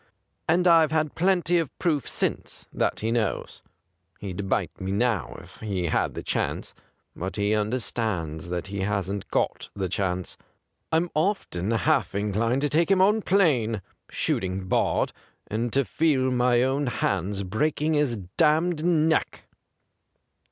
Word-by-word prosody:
And 175 +2 +4
I've 165 -2 +6
had 155 -2 0
plenty 175 -1 +2
of 160 -5 -4
proof 150 -8 0
since - - -2
that - - 0
he 110 +1 0
knows. 115 -3 -2 0.6
He'd 95 0 -5
bite - - -1
me 95 0 -2
now 110 -1 0
if - - -16
he 100 -5 -2
had - - 0
the - - -5
chance^ - - -2 0.4
but 95 +2 -4
he 105 0 +1
understands 105 -8 -1
that 90 -1 -3
he 100 +1 -5
hasn't 100 0 -2
got - - -1
the 95 -2 -1
chance. 90 -1 -2 0.5
I'm 165 +2 +1
often 155 - -1
half 115 -3 +1
in 100 0 -1
clined 115 +5 +1
to 145 - +1
take 165 +5 +2
him 195 -1 +4
on 210 +4 +4
plain 130 - +2
— - - -50
shoot - - -1
ing 95 0 -3
barred - - +1 0.2
— - - -43
and 115 +3 -1
to 140 -1 +3
feel 135 -4 +1
my 125 -1 +3
own 135 +2 0
hands 100 -3 -1
breaking 150 +10 0
his 145 -6 +1 0.2
damned 160 +1 +3
neck 160 -2 +1
120 Hz, 155 wpm, -26 LUFS, 100-155 Hz, 0.6 s, I've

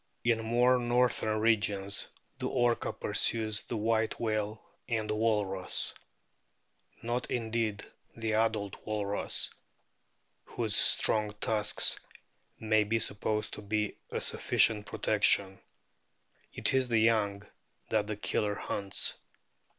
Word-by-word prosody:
In 115 -1 +1
more 120 +3 +3
northern 120 -3 +1
regions 105 -3 +1 0.3
the - - -2
Orca 120 -2 0
pursues 110 -2 +1
the 115 - -5
White 110 +1 0
whale 110 -1 -2 0.3
and 110 -2 -1
the - - -1
walrus. 105 -4 +1 1.1
Not 120 +2 -3
indeed 115 -3 -2 0.3
the 110 -1 -2
adult 110 -3 -1
walrus, 105 -1 +1 0.9
whose - - -2
strong 105 -1 +4
tusks 105 -2 +3 0.6
may 110 -1 +2
be 110 +2 0
supposed 105 0 -2
to - - -7
be 105 0 -2
a - - -4
sufficient 105 -2 +2
protection. 100 -2 +2 0.9
It - - 0
is 130 -1 +2
the 115 -2 +1
young 110 -3 +1 0.5
that 105 -2 0
the 105 -1 -4
Killer 105 0 -1
hunts. 100 -1 -1
110 Hz, 110 wpm, -30 LUFS, 105-115 Hz, 1.1 s, strong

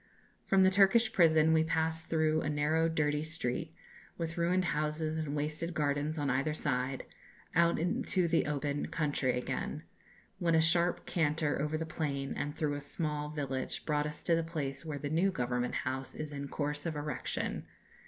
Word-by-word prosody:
"From 195 -1 +5
the 190 - +5
Turkish 210 +4 +5
prison 160 -4 +5
we 160 0 +4
passed 160 0 0
through 155 -1 +2
a 145 - -1
narrow 155 +2 +2
dirty 150 -2 +1
street, 155 0 -3 0.4
with 165 -1 -3
ruined 180 +2 +2
houses 155 0 0
and 150 -2 -2
wasted 155 +3 -2
gardens 145 +1 0
on 145 -1 -1
either 135 +3 +1
side, 130 -3 -1 0.5
out 170 0 +4
into 175 +1 +1
the 165 -2 +2
open 145 0 -1
country 145 -5 0
again, 125 - -3 0.6
when 170 -2 +2
a - - +6
sharp 170 +2 +2
canter 155 -3 0
over 150 +1 0
the 160 - -3
plain 140 -4 -2
and 145 +1 -3
through 150 -2 0
a 145 - -4
small 150 0 -3
village 140 -3 -3
brought 150 -1 +1
us 150 0 -7
to 170 - +3
the 165 - +1
place 145 -4 -4
where 155 -3 -4
the 145 - -4
new 175 +5 +3
Government 125 -6 -1
House 130 +1 -3
is 155 -1 -5
in 140 0 -4
course 145 +2 -2
of 160 - -3
erection. 150 0 -3
155 Hz, 175 wpm, -32 LUFS, 145-165 Hz, 0.6 s, a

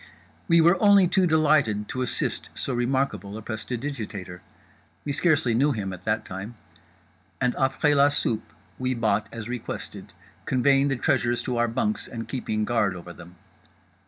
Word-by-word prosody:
We 170 -2 +5
were 170 +3 +4
only 200 -3 +6
too 185 0 +2
delighted 145 -10 +2
to 130 - -3
assist 125 - -2
so 135 - -3
remarkable 120 -4 -1
a 110 - -9
prestidigitator—we 110 -1 -7
scarcely 150 -6 +2
knew 140 +5 +3
him 100 -4 -4
at 90 0 -11
that 105 +1 0
time—and 90 +1 -7
après 135 +3 +1
la 140 0 +6
soupe 120 -6 -2 0.3
we 130 0 -1
bought 110 -3 0
as 115 -2 -7
requested, 125 -1 -6 0.4
conveying 135 +2 +3
the 135 - 0
treasures 120 -1 +1
to 125 -2 -2
our 120 0 +2
bunks 170 - -1
and 115 -2 -6
keeping 110 -5 -2
guard 105 -5 +1
over 85 0 -9
them. 85 +1 -13
120 Hz, 150 wpm, -25 LUFS, 105-140 Hz, 0.4 s, only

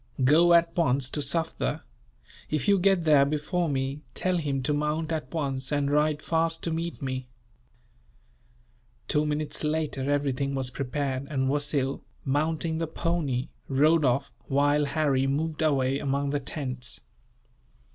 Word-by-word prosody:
Go 165 +6 +6
at 170 0 +3
once 135 -6 +2
to - - -3
Sufder. 155 +1 -1 0.7
If 150 -3 -1
you 200 -1 +5
get 190 -1 +3
there 150 -3 +6
before 155 +4 -1
me, 135 +1 -2
tell 185 -1 +1
him 140 -4 -2
to 150 - +1
mount 150 +2 -1
at 160 -1 -3
once, 135 -4 -2
and 145 -1 +1
ride 150 0 +2
fast 165 0 0
to 165 - -1
meet 165 -1 -3
me." 130 -1 -3 1.8
Two 150 0 +1
minutes 150 +1 -2
later, 150 -3 -1
everything 140 -1 0
was 130 -2 0
prepared; 135 0 -3
and 130 -3 0
Wasil, 145 -1 0 0.2
mounting 160 +3 0
the 165 - -1
pony, 155 -6 -1 0.2
rode 155 +4 +4
off, 135 +1 +1 0.2
while 145 +2 +3
Harry 140 -3 +1
moved 155 +3 -1
away 135 -3 +2
among 140 0 -1
the 145 - 0
tents. 130 -3 -4
145 Hz, 145 wpm, -27 LUFS, 135-160 Hz, 1.8 s, Go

